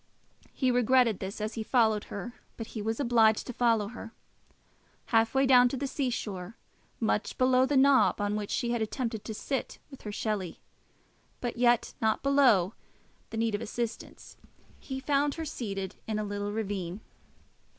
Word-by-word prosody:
He 260 -2 +1
regretted 245 -2 +3
this 195 +2 -5
as 215 +1 -3
he 225 - -4
followed 220 -2 +2
her, 235 +4 -6 0.2
but 225 - -5
he 220 - -4
was 225 +2 -2
obliged 230 -5 +3
to 250 - -6
follow 225 -4 +2
her. 230 -1 -9 1.0
Half 225 +2 +3
way 270 +1 +4
down 250 -1 +6
to 265 - -4
the 280 - -2
sea 270 -1 -1
shore, 200 -3 -5 0.4
much 215 -2 -1
below 255 0 +4
the 285 - +2
knob 270 -3 +5
on 205 0 0
which 210 -1 -3
she 240 -2 -1
had 235 -1 -1
attempted 225 0 -3
to 220 - -5
sit 270 +4 -3
with 270 - -12
her 210 - -6
Shelley, 205 -4 -3 0.8
but 240 -1 -3
yet 240 0 +2
not 220 -1 +1
below 250 -9 +4 0.6
the 225 - -6
need 225 -1 0
of 205 - -1
assistance, 235 +1 -6 0.4
he 265 -1 -6
found 285 +1 +1
her 325 - -4
seated 195 - -5
in 215 -1 -1
a 215 - -1
little 205 0 -3
ravine. 200 -3 -4
225 Hz, 170 wpm, -29 LUFS, 210-255 Hz, 1.0 s, down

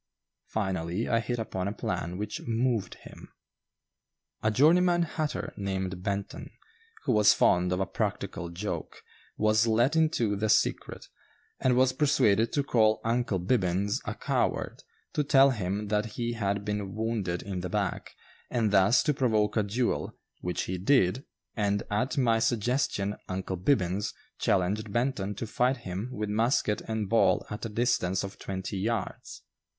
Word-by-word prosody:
Finally, 95 -1 -2
I 115 - +2
hit 120 +1 -2
upon 95 -4 -3
a - - -1
plan 90 -4 -3
which 105 +1 -4
"moved" 115 -2 0
him. - - -14 1.1
A 110 - +2
journeyman 175 +8 +4
hatter, 155 -2 -3
named 95 -2 -3
Benton, 100 0 -4 0.5
who 135 - 0
was 105 -2 +5
fond 90 -1 +3
of 90 - 0
a 95 - +1
practical 85 -1 -3
joke, 95 +5 -5 0.3
was 110 +1 +3
let 120 +7 +3
into 155 -10 +2
the 105 +2 -1
secret, - - +1 0.5
and 130 -1 +2
was 130 0 +4
persuaded 130 -6 +3
to 145 - +1
call 110 -5 +3
"Uncle 115 -3 0
Bibbins" 95 0 0
a - - -4
coward, - - -1 0.3
to 150 - +1
tell 140 -1 +5
him 105 -2 -3
that 105 +1 -1
he 120 0 -1
had 100 -2 -2
been 105 -1 -3
wounded 110 -6 -2
in 95 -3 -4
the 90 0 -4
back, 100 -2 -2 0.4
and 110 -4 +1
thus 100 +4 +5
to 150 - +2
provoke 110 -6 +1
a 110 - +3
duel, 115 +4 -1 0.2
which 90 -1 -2
he 90 0 -4
did, 120 +2 +2 0.3
and 100 -1 0
at 125 +8 0
my 115 -4 +3
suggestion 115 -3 0
"Uncle 95 0 -3
Bibbins" 95 0 0 0.2
challenged 100 +3 0
Benton 120 -4 -1
to 115 - -4
fight 125 +4 +1
him 95 +6 -4
with 105 -4 -3
musket 110 -1 +1
and 110 -2 -2
ball 115 +3 +3
at 105 +2 -4
a - - -9
distance 105 -5 0
of 100 0 -7
twenty 95 +1 -4
yards. 115 +3 -3
105 Hz, 155 wpm, -28 LUFS, 95-120 Hz, 1.1 s, was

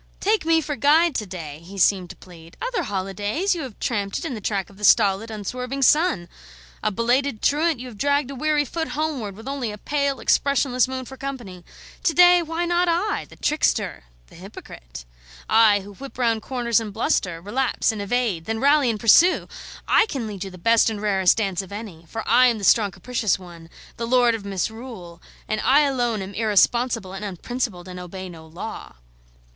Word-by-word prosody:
"Take 420 -4 +1
me 325 0 +4
for 295 -1 -4
guide 310 +4 +4
to 215 -5 -3
day," 160 -5 -7
he 195 +3 -11
seemed 185 -1 +2
to - - -9
plead. 170 -2 -15
"Other - - -2
holidays 205 - -2
you 340 - -4
have 255 -7 -8
tramped 200 -4 -2
it - - -5
in 285 - -3
the 220 - -6
track 200 -2 -2
of 195 - -18
the - - -10
stolid, 205 0 +4
unswerving 250 +6 -4
sun; 295 - +3 0.5
a - - +1
belated 240 +3 0
truant, 305 -1 +2
you 255 - -7
have 220 -5 -12
dragged 285 -1 +1
a - - -7
weary 300 +2 +1
foot 320 +4 -3
homeward 275 -11 -2
with 225 +5 -12
only 270 -5 -3
a 210 - -8
pale, 280 +3 -1
expressionless 270 -3 +2
moon 260 0 -5
for 265 +2 -11
company. 240 -11 -7 0.4
To 330 - +1
day 355 0 +7
why 330 +1 -2
not 350 +1 +1
I, 360 +5 -1
the - - -14
trickster, 215 - 0 0.2
the - - -21
hypocrite? - - -11 0.4
I, 220 -2 +5
who 200 +1 -11
whip 275 +6 -11
round 230 -3 +1
corners 235 -2 0
and 220 -2 -6
bluster, 195 - -1
relapse 240 +8 0
and 215 -2 -5
evade, 200 -6 -1
then 225 0 -2
rally 280 0 +4
and 220 -2 -2
pursue! 335 - +5 0.4
I - - +4
can 265 - -4
lead 205 -3 -6
you 195 - -6
the 185 - -12
best 230 +6 +3
and 215 -2 -5
rarest 195 -3 +2
dance 195 -4 -1
of 190 - -12
any; 200 -6 -8
for 225 +6 -6
I 250 +3 +6
am 235 -2 +1
the 205 - -8
strong 210 +1 +4
capricious 215 +2 -1
one, 170 -3 -13 0.3
the 230 - -3
lord 245 -1 +4
of 220 -3 -5
misrule, 200 -2 -5 0.3
and 215 0 -1
I 280 +3 +5
alone 245 -7 0
am 190 +1 -8
irresponsible 225 -1 +1
and 195 +2 -7
unprincipled, 200 -1 -4
and 180 0 -8
obey 185 +1 -8
no 160 -2 -12
law." 175 +7 -8
225 Hz, 200 wpm, -23 LUFS, 195-275 Hz, 0.5 s, day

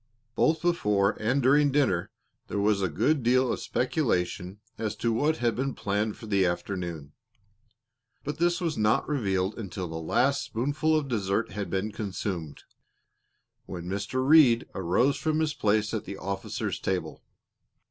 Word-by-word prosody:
Both 160 +5 +2
before 105 - +2
and 125 +5 +1
during 145 +2 +4
dinner, 130 -12 +1 0.4
there - - -4
was 100 0 +2
a 95 - +1
good 140 - +1
deal 125 +1 +3
of - - -4
speculation 100 - -1 0.2
as 110 -2 -2
to 115 -1 0
what 150 +7 +1
had 120 -1 0
been 135 +1 -2
planned 105 +1 -1
for - - -10
the 100 -3 +2
afternoon. 85 -4 -3 1.1
But 150 +2 -5
this 175 +1 +2
was 165 -7 -2
not 110 +2 +2
revealed 100 -7 -1
until 95 -3 -5
the 80 0 -5
last 140 - +1
spoonful 145 +7 0
of 150 -2 -2
dessert 105 -3 -1
had 100 0 -4
been 95 +3 -1
consumed, 95 -6 -5 1.0
when 85 - -6
Mr. 100 +8 -2
Reed 140 -7 +6
arose 100 - +1
from 155 0 0
his 155 -2 0
place 105 -2 +1
at 110 - -3
the 100 0 -6
officers' 95 0 -3
table. 90 -4 -3
110 Hz, 155 wpm, -27 LUFS, 95-140 Hz, 1.1 s, Reed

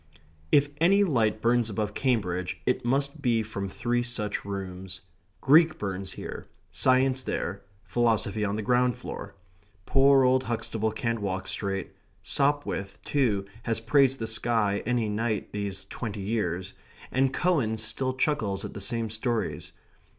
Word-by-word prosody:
If 145 0 +4
any 195 +6 +5
light 110 - +1
burns 120 -1 +3
above 105 -1 -2
Cambridge, 95 -9 -1
it - - +1
must 140 +4 0
be 115 -4 +2
from 100 -2 -5
three 120 +5 0
such 120 -4 -2
rooms; 95 -1 -6 0.4
Greek 160 +3 +6
burns 95 -1 -4
here; - - -7 0.2
science 130 0 +3
there; 100 -5 -3 0.2
philosophy 110 0 +1
on 100 0 0
the 110 - -3
ground 125 +1 +3
floor. - - -7 0.5
Poor 135 0 +5
old 130 +1 +3
Huxtable 110 -1 -1
can't 115 +1 -2
walk 95 -1 -2
straight; 95 0 -3 0.3
Sopwith, 140 -9 0
too, 110 -9 +1 0.2
has 115 -2 0
praised 135 +3 +3
the 115 - -3
sky 110 -2 +1
any 120 -3 +1
night 110 +1 -2
these 100 -2 -3
twenty 105 -4 -5
years; 95 -3 -2 0.4
and 130 +1 +2
Cowan 135 -11 +1
still 130 +4 -2
chuckles 115 -9 0
at - - -7
the 100 - -6
same 115 +2 -1
stories. 110 +2 -2
115 Hz, 145 wpm, -27 LUFS, 100-130 Hz, 0.5 s, Greek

